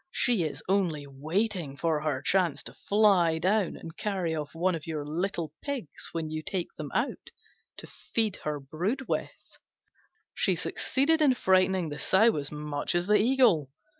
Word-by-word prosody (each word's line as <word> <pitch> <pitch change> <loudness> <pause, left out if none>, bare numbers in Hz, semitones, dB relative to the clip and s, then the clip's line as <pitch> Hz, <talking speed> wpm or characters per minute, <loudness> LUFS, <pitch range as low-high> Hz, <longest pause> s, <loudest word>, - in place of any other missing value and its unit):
She 240 - +1
is 145 -2 -5
only 175 -7 +1
waiting 155 +2 -2
her 155 -3 0
chance 175 -7 +1
to - - -7
fly 195 -6 +3
down 190 +3 +1
and 165 0 -10
carry 185 -5 -2
off 150 0 -5
one 180 +3 +1
of 165 -1 -5
your 155 -3 -3
little 165 0 -3
pigs 275 - -5
when 160 -2 -3
you 155 0 -3
take 180 +2 -4
them - - -6
out, - - -1 0.5
to - - -8
feed 220 -4 -2
her 150 -1 -3
brood 180 - -3
with." - - -5 0.7
She - - +1
succeeded 315 +4 +1
in 275 -4 +5
frightening 185 -4 +2
the 145 0 -6
Sow 220 0 +4
as 145 -1 -4
much 150 +1 -3
as 175 0 +1
the 210 +2 +4
Eagle. 225 - +3
175 Hz, 165 wpm, -28 LUFS, 150-205 Hz, 0.7 s, in